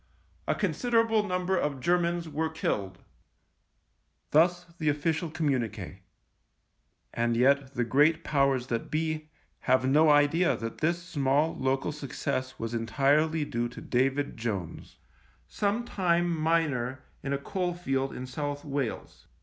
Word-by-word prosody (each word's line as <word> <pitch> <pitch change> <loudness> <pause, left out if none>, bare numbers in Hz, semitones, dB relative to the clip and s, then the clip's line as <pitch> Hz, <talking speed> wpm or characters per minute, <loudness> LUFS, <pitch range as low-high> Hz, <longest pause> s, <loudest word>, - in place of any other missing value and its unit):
A - - +2
consider 235 -2 +1
able 225 -1 +2
number 185 -2 -1
of 150 -6 -1
Germans 170 +2 +1
were 160 +1 -1
killed." 95 -11 -3 1.3
Thus 175 +3 +4
the 155 -2 +1
official 160 +3 0
communique. 115 - -2 1.1
And 115 0 0
yet 140 +2 +3
the 125 - +1
great 150 +7 +3
powers 135 -4 +2
that 115 -2 -3
be 155 0 -2 0.3
have 130 0 +2
no 155 +4 +5
idea 150 +4 +4
that 115 0 -6
this 170 +2 0
small 145 -2 +1
local 135 +2 0
success 140 -2 -4
was 115 0 -4
en 115 -1 -2
tirely 150 +5 +2
due 120 -3 -2
to 120 - -10
David 135 +3 0
Jones 100 -8 -5 0.3
— - - -33
sometime 185 -5 0
miner 150 -6 0 0.2
in 135 - -4
a 140 - +1
coal 175 +5 -2
field 135 -6 -1
in 130 - -6
South 145 +2 -4
Wales. 140 -5 -4
145 Hz, 135 wpm, -28 LUFS, 130-165 Hz, 1.3 s, no